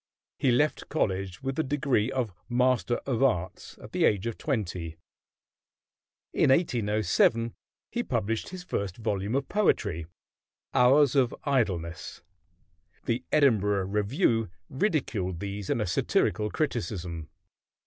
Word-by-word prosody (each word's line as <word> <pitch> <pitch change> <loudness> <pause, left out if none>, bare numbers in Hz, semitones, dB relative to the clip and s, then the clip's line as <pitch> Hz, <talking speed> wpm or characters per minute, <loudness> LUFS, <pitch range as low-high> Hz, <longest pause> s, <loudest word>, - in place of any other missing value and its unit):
He 135 - +2
left 145 +5 +1
college 95 - -1
with 135 0 -2
the 160 - +2
degree 135 -5 +1
of 120 -7 -2 0.2
Master 125 -1 +2
of 130 -4 -1
Arts 95 -10 0
at - - -12
the - - 0
age 100 -1 +3
of 115 -2 -2
twenty. 90 - -3 1.4
In - - +3
1807 115 - +2 0.4
he 240 - -1
published 115 - -2
his 185 -1 -8
first 100 - -3
volume 105 0 -2
of 135 0 0
poetry, 100 - +1 0.7
"Hours 135 +2 +5
of 130 -3 +3
Idleness." 90 - -1 0.8
The 120 +1 -1
Edinburgh 105 -9 +3
Review 115 - +1 0.2
ridiculed 120 - -1
these 100 0 -5
in - - +1
a 105 - 0
satirical 105 +4 +1
criticism. 90 - -3
115 Hz, 120 wpm, -28 LUFS, 100-135 Hz, 1.4 s, Hours